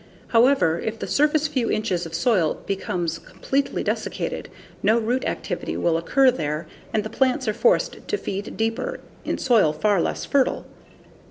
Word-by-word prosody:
However, 230 Hz, -9 st, +4 dB
if 220 Hz, 0 st, -3 dB
the -, -, -4 dB
surface 300 Hz, +1 st, +2 dB
few 260 Hz, -6 st, -1 dB
inches 185 Hz, -6 st, -1 dB
of 165 Hz, -, -7 dB
soil 185 Hz, -6 st, +2 dB
becomes 180 Hz, -4 st, -2 dB
completely 275 Hz, +1 st, -2 dB
desiccated, -, -, -3 dB, 0.3 s
no 220 Hz, +3 st, +4 dB
root 240 Hz, +3 st, 0 dB
activity -, -, -3 dB
will 170 Hz, -1 st, +1 dB
occur 255 Hz, +11 st, +4 dB
there 155 Hz, -7 st, -3 dB, 0.3 s
and 215 Hz, -, 0 dB
the 215 Hz, -, -5 dB
plants 260 Hz, -1 st, +1 dB
are 215 Hz, -, +2 dB
forced 480 Hz, -, +1 dB
to 415 Hz, -, 0 dB
feed 200 Hz, -, -5 dB
deeper, 225 Hz, +2 st, -1 dB, 0.3 s
in -, -, -1 dB
soil 225 Hz, -11 st, +4 dB
far 195 Hz, +4 st, +2 dB
less -, -, -2 dB
fertile. 275 Hz, -2 st, +1 dB
220 Hz, 160 wpm, -23 LUFS, 175-260 Hz, 0.3 s, However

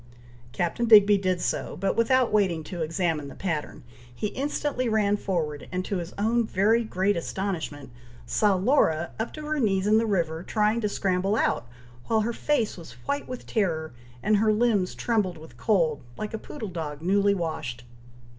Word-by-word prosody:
Captain 175 Hz, -, -1 dB
Digby 210 Hz, -2 st, +8 dB
did 185 Hz, -2 st, 0 dB
so; -, -, -2 dB
but 195 Hz, -, 0 dB
without 250 Hz, 0 st, +3 dB
waiting 185 Hz, -6 st, +2 dB
to 170 Hz, +2 st, -6 dB
examine 160 Hz, -2 st, -1 dB
the -, -, -10 dB
pattern, 165 Hz, -6 st, -4 dB, 0.3 s
he 210 Hz, -, -2 dB
instantly 275 Hz, -2 st, -2 dB
ran 210 Hz, -2 st, +2 dB
forward, 160 Hz, -8 st, -3 dB
and 185 Hz, 0 st, -2 dB
to 200 Hz, -, -2 dB
his 175 Hz, 0 st, -5 dB
own 230 Hz, +3 st, +2 dB
very 220 Hz, +3 st, +2 dB
great 200 Hz, -1 st, 0 dB
astonishment, 165 Hz, -6 st, -4 dB, 0.3 s
saw 205 Hz, -2 st, +2 dB
Laura 185 Hz, -, +2 dB
up 220 Hz, -, -2 dB
to 305 Hz, -, -8 dB
her 305 Hz, 0 st, -1 dB
knees 195 Hz, -5 st, +1 dB
in 215 Hz, +1 st, +5 dB
the 225 Hz, -, 0 dB
river, 165 Hz, -5 st, 0 dB
trying 215 Hz, +4 st, +1 dB
to 210 Hz, -, 0 dB
scramble 195 Hz, 0 st, 0 dB
out, 125 Hz, -, 0 dB, 0.4 s
while 220 Hz, -1 st, +2 dB
her 235 Hz, +2 st, -1 dB
face 250 Hz, -6 st, 0 dB
was 165 Hz, -8 st, -10 dB
white 285 Hz, 0 st, -2 dB
with 255 Hz, -1 st, -7 dB
terror, 160 Hz, -, -1 dB, 0.3 s
and 210 Hz, 0 st, +3 dB
her 215 Hz, +1 st, +3 dB
limbs 210 Hz, -4 st, +1 dB
trembled 210 Hz, -8 st, 0 dB
with 155 Hz, -5 st, -13 dB
cold, 160 Hz, -, +1 dB, 0.2 s
like 215 Hz, 0 st, -5 dB
a 220 Hz, -, -3 dB
poodle 220 Hz, -5 st, -7 dB
dog 155 Hz, -4 st, -5 dB
newly 200 Hz, +2 st, +3 dB
washed. 155 Hz, -9 st, -4 dB
200 Hz, 175 wpm, -26 LUFS, 170-220 Hz, 0.4 s, Digby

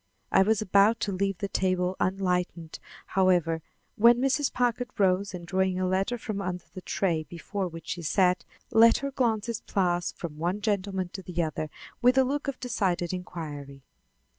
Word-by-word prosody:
I -, -, +5 dB
was 215 Hz, +2 st, +2 dB
about 200 Hz, +3 st, +4 dB
to 205 Hz, -, 0 dB
leave 195 Hz, 0 st, -1 dB
the 200 Hz, -, -3 dB
table 185 Hz, -1 st, 0 dB
unenlightened, 180 Hz, -3 st, -1 dB, 0.3 s
however, 175 Hz, -4 st, +2 dB, 0.3 s
when 235 Hz, +2 st, +6 dB
Mrs. 270 Hz, +2 st, +1 dB
Packard 245 Hz, 0 st, 0 dB
rose 195 Hz, 0 st, +2 dB
and, 175 Hz, -1 st, -8 dB
drawing 190 Hz, 0 st, 0 dB
a 185 Hz, -, +1 dB
letter 195 Hz, +6 st, 0 dB
from 215 Hz, -3 st, -4 dB
under 180 Hz, -2 st, -4 dB
the 185 Hz, -, -7 dB
tray 175 Hz, -4 st, 0 dB
before 180 Hz, +4 st, -4 dB
which 165 Hz, -1 st, -9 dB
she 175 Hz, -, -3 dB
sat, 180 Hz, +3 st, +2 dB, 0.3 s
let 230 Hz, 0 st, +6 dB
her 275 Hz, -, -2 dB
glances 230 Hz, -3 st, 0 dB
pass 175 Hz, -3 st, 0 dB
from 160 Hz, -4 st, -7 dB
one 175 Hz, +5 st, -1 dB
gentleman 200 Hz, -3 st, -1 dB
to 190 Hz, -, -7 dB
the 175 Hz, -2 st, -2 dB
other 155 Hz, 0 st, -3 dB, 0.3 s
with 250 Hz, +2 st, +4 dB
a 265 Hz, -, +7 dB
look 285 Hz, +3 st, -2 dB
of 275 Hz, -, -3 dB
decided 185 Hz, -8 st, -1 dB
inquiry. 145 Hz, -6 st, -7 dB
190 Hz, 170 wpm, -27 LUFS, 175-215 Hz, 0.3 s, a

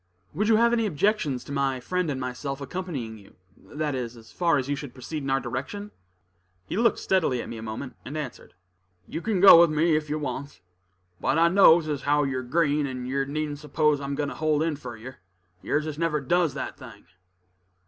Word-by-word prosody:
"Would 210 Hz, +7 st, 0 dB
you 225 Hz, -, +5 dB
have 235 Hz, +2 st, +4 dB
any 230 Hz, -2 st, +2 dB
objections 160 Hz, -, 0 dB
to -, -, -10 dB
my 135 Hz, -2 st, 0 dB
friend 180 Hz, +6 st, -1 dB
and 135 Hz, -2 st, -2 dB
myself 130 Hz, +2 st, -4 dB
accompanying 140 Hz, -8 st, -5 dB
you, 100 Hz, -, -19 dB, 0.2 s
that 150 Hz, 0 st, -4 dB
is, 125 Hz, -2 st, -4 dB
as 110 Hz, -1 st, -15 dB
far 170 Hz, -4 st, +2 dB
as 130 Hz, -1 st, -2 dB
you 145 Hz, -, 0 dB
should 140 Hz, -3 st, -8 dB
proceed 150 Hz, +4 st, -5 dB
in 135 Hz, -, -4 dB
our 135 Hz, 0 st, +2 dB
direction?" 135 Hz, -, -5 dB, 0.7 s
He -, -, -5 dB
looked 230 Hz, +3 st, +3 dB
steadily 165 Hz, -10 st, +1 dB
at -, -, -5 dB
me 115 Hz, -, -6 dB
a -, -, -8 dB
moment, 115 Hz, +4 st, -6 dB
and 145 Hz, +4 st, -6 dB
answered, 145 Hz, -11 st, -7 dB, 0.5 s
"You 160 Hz, -, -5 dB
kin 215 Hz, -2 st, 0 dB
go 190 Hz, -3 st, +10 dB
with 170 Hz, -, +5 dB
me 155 Hz, +1 st, +2 dB
ef 155 Hz, -1 st, -2 dB
you 150 Hz, -, -1 dB
wants; 145 Hz, -1 st, -5 dB, 0.6 s
but -, -, +1 dB
I 165 Hz, +1 st, +5 dB
knows 170 Hz, -3 st, +6 dB
as 145 Hz, -3 st, -2 dB
how 145 Hz, +1 st, +2 dB
you're 130 Hz, -2 st, -1 dB
green, 145 Hz, +2 st, +1 dB
and 125 Hz, -2 st, -5 dB
yer 135 Hz, +1 st, 0 dB
needn't 145 Hz, +1 st, -3 dB
s'pose 150 Hz, -1 st, +1 dB
I'm 140 Hz, 0 st, -3 dB
goin' 145 Hz, 0 st, -1 dB
to -, -, -6 dB
hold 155 Hz, -1 st, +1 dB
in 160 Hz, -2 st, 0 dB
fur 125 Hz, -5 st, -8 dB
yer. 130 Hz, +4 st, -10 dB, 0.4 s
Yers 150 Hz, +1 st, 0 dB
as 155 Hz, -1 st, -5 dB
never 165 Hz, -2 st, +1 dB
does 160 Hz, +2 st, +1 dB
that -, -, -5 dB
thing." 115 Hz, -8 st, -12 dB
145 Hz, 215 wpm, -26 LUFS, 130-165 Hz, 0.7 s, go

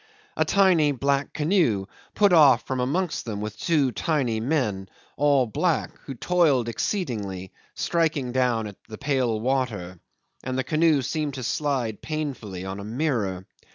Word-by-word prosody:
A -, -, +2 dB
tiny 180 Hz, -7 st, +4 dB
black 140 Hz, +1 st, 0 dB
canoe 150 Hz, -, +1 dB, 0.3 s
put 205 Hz, -3 st, +4 dB
off 140 Hz, -7 st, +6 dB
from 130 Hz, -1 st, -3 dB
amongst 155 Hz, +7 st, -1 dB
them 110 Hz, -3 st, -4 dB
with 105 Hz, 0 st, -5 dB
two 150 Hz, -7 st, +2 dB
tiny 125 Hz, -2 st, 0 dB
men, 110 Hz, -7 st, -1 dB, 0.3 s
all 140 Hz, -3 st, +3 dB
black, 110 Hz, -, 0 dB
who 135 Hz, -, -6 dB
toiled 145 Hz, -5 st, +2 dB
exceedingly, 105 Hz, -, -3 dB, 0.2 s
striking 155 Hz, -7 st, 0 dB
down 125 Hz, -3 st, +1 dB
at 100 Hz, -2 st, -8 dB
the 110 Hz, -, -8 dB
pale 130 Hz, -5 st, 0 dB
water: 110 Hz, -8 st, -2 dB, 0.4 s
and 130 Hz, 0 st, -3 dB
the 130 Hz, -, 0 dB
canoe 155 Hz, 0 st, +2 dB
seemed 150 Hz, +1 st, -2 dB
to 130 Hz, -, -5 dB
slide 125 Hz, -6 st, -1 dB
painfully 130 Hz, -, -4 dB
on 95 Hz, +1 st, -5 dB
a -, -, -6 dB
mirror. 110 Hz, -6 st, -2 dB
130 Hz, 150 wpm, -25 LUFS, 110-150 Hz, 0.4 s, off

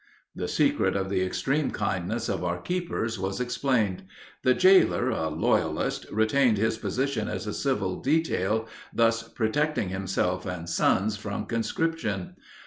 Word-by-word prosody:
The -, -, -3 dB
secret -, -, +2 dB
of 95 Hz, 0 st, -1 dB
the 95 Hz, -2 st, +1 dB
extreme 135 Hz, +10 st, 0 dB
kindness 95 Hz, -4 st, -2 dB
of -, -, -2 dB
our 90 Hz, 0 st, -1 dB
keepers 120 Hz, -, -2 dB
was 95 Hz, +1 st, -2 dB
explained. 125 Hz, -5 st, 0 dB, 0.4 s
The 130 Hz, 0 st, +4 dB
jailer, 185 Hz, -9 st, +5 dB
a 80 Hz, -8 st, -1 dB
loyalist, 75 Hz, -, 0 dB
retained 110 Hz, +2 st, +3 dB
his 110 Hz, +2 st, 0 dB
position 130 Hz, -4 st, -1 dB
as -, -, -4 dB
a 105 Hz, -, -3 dB
civil 105 Hz, -10 st, -1 dB
detail, 115 Hz, -, +1 dB, 0.2 s
thus 115 Hz, 0 st, +2 dB
protecting 115 Hz, +1 st, -1 dB
himself 95 Hz, -1 st, -1 dB
and 90 Hz, -2 st, -5 dB
sons 105 Hz, +4 st, +2 dB
from 100 Hz, 0 st, -4 dB
conscription. 115 Hz, -, -2 dB
110 Hz, 135 wpm, -27 LUFS, 95-130 Hz, 0.4 s, jailer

